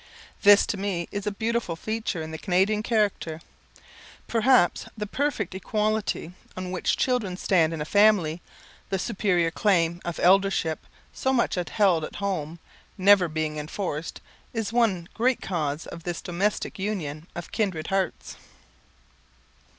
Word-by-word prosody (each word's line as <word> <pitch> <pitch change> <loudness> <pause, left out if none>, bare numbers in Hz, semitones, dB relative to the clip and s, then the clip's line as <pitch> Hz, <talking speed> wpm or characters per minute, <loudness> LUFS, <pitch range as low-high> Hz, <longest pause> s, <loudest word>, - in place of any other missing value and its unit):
This 205 0 +7
to 205 - -3
me 190 -4 -2
is 205 0 -4
a - - +1
beautiful 220 -3 -1
feature 215 -2 -3
in 160 - -7
the 160 - -6
Canadian 195 +4 +2
character. 210 -8 0 0.9
Perhaps 235 -4 +3
the 210 - -3
perfect 220 - -2
equality 210 -2 -1 0.2
on 185 0 -4
which 185 - 0
children 225 -8 0
stand 170 -5 +2
in 160 -2 -4
a - - -2
family, 190 -4 +3 0.5
the 195 - 0
superior 185 -5 +1
claim 170 -2 +1
of 175 -1 -4
eldership, 190 -3 +2 0.3
so 265 - 0
much 255 -3 +1
upheld 180 -2 +2
at - - -6
home, 170 -5 -3 0.4
never 195 -1 +6
being 155 -1 -2
enforced, 155 0 -4 0.3
is 225 -2 -3
one 205 -8 +2
great 245 +2 +1
cause 155 -4 -2
of 170 - -9
this 175 0 -4
domestic 195 +4 -2
union 170 -6 -3
of 175 - -7
kindred 185 -8 -1
hearts. 195 -1 -2
190 Hz, 140 wpm, -26 LUFS, 165-210 Hz, 0.9 s, This